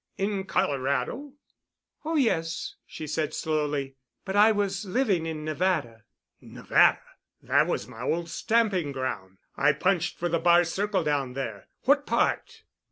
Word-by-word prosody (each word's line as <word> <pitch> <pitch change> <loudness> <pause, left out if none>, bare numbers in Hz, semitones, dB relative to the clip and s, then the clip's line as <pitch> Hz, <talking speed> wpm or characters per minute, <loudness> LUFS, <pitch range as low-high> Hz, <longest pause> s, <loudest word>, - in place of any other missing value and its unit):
"In 195 -1 -1
Colorado?" 140 - -1 0.7
"Oh, 320 +1 -2
yes," 175 - 0
she 155 - -7
said 155 0 -2
slowly, 145 -3 -2 0.3
"but 190 0 -3
I 210 +2 +6
was 200 -2 -1
living 195 -5 0
in 155 -1 -5
Nevada." 155 - -1 0.4
"Nevada? - - +2 0.4
That - - +3
was - - -2
my 115 - -11
old 165 +6 -1
stamping 195 -6 0
ground. 95 -8 -4 0.2
I 145 +2 +3
punched 180 +3 0
for 175 - -1
the 170 -1 0
Bar 175 +1 +5
Circle 190 +2 -1
down 140 -4 -1
there. 115 -6 -5 0.2
What 285 +2 +3
part?" 455 -2 0
170 Hz, 140 wpm, -27 LUFS, 145-200 Hz, 0.7 s, I